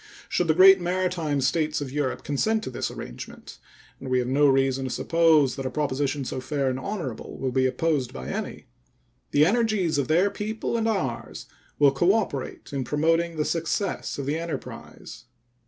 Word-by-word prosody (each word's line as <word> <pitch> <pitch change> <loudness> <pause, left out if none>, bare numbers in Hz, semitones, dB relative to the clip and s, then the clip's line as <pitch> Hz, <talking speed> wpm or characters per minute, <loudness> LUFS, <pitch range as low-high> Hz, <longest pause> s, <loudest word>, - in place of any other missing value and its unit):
Should 175 - 0
the 155 - +3
great 190 +1 +8
maritime 175 -5 -1
States 155 +4 +1
of 140 -3 -5
Europe 145 -2 -2
consent 215 +10 0
to - - -5
this - - -3
arrangement - - -9 0.4
(and 135 - -7
we 130 - +2
have 125 -1 0
no 145 +3 +4
reason 135 -1 +2
to - - -3
suppose 160 -1 +3
that 135 - -5
a - - -2
proposition 140 0 -1
so 130 - -4
fair 135 0 -1
and 130 - -3
honorable 165 - -5
will 130 -1 -2
be 130 +1 +2
opposed 135 0 0
by 65 -1 -7
any), - - -5 0.6
the 145 +1 +4
energies 205 -7 +1
of 140 - 0
their 175 +6 +3
people 220 +2 -3
and 225 -1 0
ours 140 - -3 0.3
will 145 -2 +5
cooperate 175 - -1
in 135 -2 -1
promoting 165 +5 +1
the 150 - 0
success 165 +4 -2
of 140 - -4
the 150 +4 -1
enterprise. 170 -6 -8
150 Hz, 175 wpm, -25 LUFS, 135-175 Hz, 0.6 s, great